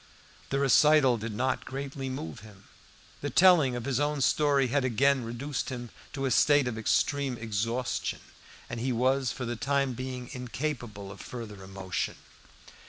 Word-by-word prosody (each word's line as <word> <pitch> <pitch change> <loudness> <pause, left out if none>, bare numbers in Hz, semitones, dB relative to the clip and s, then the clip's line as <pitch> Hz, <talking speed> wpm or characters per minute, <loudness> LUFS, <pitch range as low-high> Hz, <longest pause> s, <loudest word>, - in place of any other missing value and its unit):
The 135 - 0
recital 140 -1 +5
did 110 +1 -4
not 130 +5 -1
greatly 135 0 -5
move 80 - -5
him. 105 -2 -15 0.6
The 145 - -2
telling 160 -4 +5
of 120 -1 -4
his 135 -1 0
own 145 0 0
story 140 0 +3
had 140 +2 +1
again 130 +2 +2
reduced 125 +5 -4
him 120 -3 -6 0.2
to 135 -1 -2
a 130 - 0
state 145 +2 +4
of 120 - -2
extreme 130 +4 +1
exhaustion, 115 +3 -2 0.5
and 115 - -5
he 130 +3 -1
was 130 +1 +2
for 125 - -5
the 120 +1 -3
time 140 +1 0
being 125 0 -6
incapable 125 -6 -4
of 100 - -10
further 105 -5 -8
emotion. 95 -1 -3
130 Hz, 160 wpm, -29 LUFS, 115-140 Hz, 0.6 s, recital